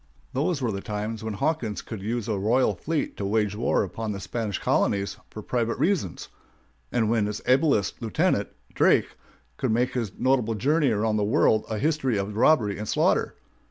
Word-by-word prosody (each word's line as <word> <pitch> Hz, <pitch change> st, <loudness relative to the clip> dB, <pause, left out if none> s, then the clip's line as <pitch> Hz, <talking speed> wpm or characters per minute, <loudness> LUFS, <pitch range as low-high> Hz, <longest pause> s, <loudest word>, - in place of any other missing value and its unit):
Those 140 Hz, +1 st, 0 dB
were 115 Hz, -, +1 dB
the 100 Hz, -1 st, -4 dB
times 105 Hz, +2 st, -4 dB
when 110 Hz, -2 st, -3 dB
Hawkins 130 Hz, -5 st, -1 dB
could 110 Hz, -4 st, -7 dB
use 115 Hz, +2 st, -2 dB
a 110 Hz, -, 0 dB
royal 115 Hz, +3 st, +2 dB
fleet 155 Hz, -, -3 dB
to -, -, -4 dB
wage 105 Hz, 0 st, 0 dB
war 115 Hz, 0 st, +1 dB
upon 110 Hz, +3 st, -4 dB
the 100 Hz, -, -4 dB
Spanish 110 Hz, -2 st, -3 dB
colonies 100 Hz, 0 st, 0 dB
for 110 Hz, -, -8 dB
private 115 Hz, 0 st, -1 dB
reasons; 155 Hz, -, -1 dB, 0.6 s
and 115 Hz, -3 st, +1 dB
when 110 Hz, -2 st, +2 dB
his 105 Hz, 0 st, -4 dB
ablest 130 Hz, -, +2 dB
lieutenant, 110 Hz, -3 st, +1 dB, 0.2 s
Drake, -, -, +3 dB, 0.5 s
could -, -, -1 dB
make 120 Hz, +3 st, +1 dB
his 115 Hz, -6 st, -2 dB
notable 125 Hz, -4 st, +1 dB
journey 145 Hz, +6 st, +2 dB
around 110 Hz, 0 st, +1 dB
the 105 Hz, -, +1 dB
world 110 Hz, -1 st, +3 dB
a 110 Hz, -, -2 dB
history 135 Hz, -3 st, 0 dB
of 100 Hz, +1 st, -3 dB
robbery 110 Hz, -5 st, +3 dB
and 105 Hz, -, -5 dB
slaughter. -, -, +1 dB
110 Hz, 180 wpm, -26 LUFS, 105-130 Hz, 0.6 s, Drake